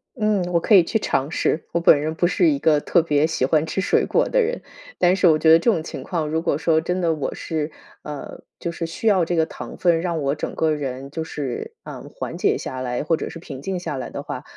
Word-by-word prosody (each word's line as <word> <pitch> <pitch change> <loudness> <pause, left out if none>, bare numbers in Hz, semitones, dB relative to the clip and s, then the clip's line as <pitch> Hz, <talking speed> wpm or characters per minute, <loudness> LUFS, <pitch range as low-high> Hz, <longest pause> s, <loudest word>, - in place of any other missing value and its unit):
嗯， 215 -4 +1
我 170 - +3
可 205 +5 +4
以 185 - +8
去 220 +6 -1
尝 140 -5 -1
试。 160 - 0
我 170 - +1
本 155 -3 +5
人 155 +1 -2
不 175 - +2
是 320 - +3
一 285 - 0
个 150 - +3
特 170 - +3
别 150 -2 +2
喜 160 -5 0
欢 155 +3 +2
吃 160 - -3
水 190 - +2
果 - - +1
的 - - +2
人， 480 +2 -1 0.4
但 180 +1 +4
是 190 - +1
我 155 -2 +4
觉 160 - +4
得 160 - +9
这 230 +8 +2
种 165 - 0
情 - - -7
况 165 -4 -2
如 160 +2 -1
果 165 -4 0
说 160 0 +2
真 180 +3 -2
的 170 -2 +1
我 150 - -3
是 155 -1 -3 0.3
呃， 150 -1 -8 0.2
就 170 - -4
是 165 - -4
需 165 +7 -4
要 195 -5 +4
这 170 +1 -1
个 160 - +3
糖 - - -9
分 170 -2 +2
让 170 -3 -2
我 140 0 0
整 150 - -5
个 160 -1 +1
人 135 -2 -5
就 160 +1 -3
是， 140 -6 -5
嗯， - - -9
缓 - - -5
解 - - +2
下 130 0 -5
来 125 0 -2
或 165 +2 +2
者 - - -5
是 - - -9
平 140 -5 -9
静 190 +3 -3
下 160 -4 -4
来 130 -2 -5
的 - - -6
话， - - -6
160 Hz, 285 characters per minute, -22 LUFS, 150-175 Hz, 0.4 s, 得